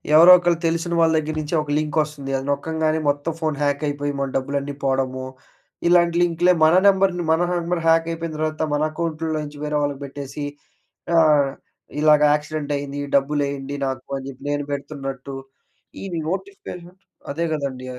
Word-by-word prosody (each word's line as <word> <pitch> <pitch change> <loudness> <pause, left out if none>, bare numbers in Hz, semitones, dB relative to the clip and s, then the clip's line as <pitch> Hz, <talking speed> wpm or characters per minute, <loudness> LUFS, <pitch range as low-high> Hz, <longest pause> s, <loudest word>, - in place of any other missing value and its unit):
ఎవరో 170 +3 +9
ఒకరు 175 -1 +1
తెలిసిన 165 +1 -1
వాళ్ళ 165 -1 +4
దగ్గర 155 0 -2
నుంచి 155 +2 -3
ఒక 150 - -8
లింక్ 155 +1 -2
వస్తుంది. 145 -3 -7
అది 135 - -5
నొక్కంగానే 160 +2 0
మొత్తం 145 +3 -1
ఫోన్ 155 -2 0
హ్యాక్ 145 0 0
అయిపోయి 145 0 -2
మన 140 - 0
డబ్బులన్నీ 140 +1 -3
పోవడము. 130 -1 -1 0.6
ఇలాంటి 170 -1 +4
లింక్‌లే 175 +1 +3
మన 160 +2 +5
నంబర్‌ని 190 -3 +3
మన 160 +1 +3
నంబర్ 175 0 -1
హ్యాక్ 165 0 +4
అయిపోయిన 165 -1 -5
తర్వాత 155 0 -2
మన 145 - +1
అకౌంట్‌లో 160 0 -3
నుంచి 145 0 -9
వేరే 150 0 -1
వాళ్ళకి 145 -1 -2
పెట్టేసి, 140 +1 -6 0.7
ఆహ్, 150 -4 +5 0.5
ఇలాగా 150 -1 +5
"యాక్సిడెంట్ 150 -1 -3
అయింది. 140 0 -5 0.2
డబ్బులేయండి 140 0 -1
నాకు" 130 0 -5
అని 135 - -9
చెప్పి 135 +1 -14
నేను 145 0 -2
పెడుతున్నట్టు 135 -2 -5 0.7
ఈ - - -6 0.2
నోటిఫికేషన్ 185 - -6 0.4
అదే 165 +4 -2
కదండీ! 135 -4 -4
150 Hz, 155 wpm, -22 LUFS, 140-165 Hz, 0.7 s, ఎవరో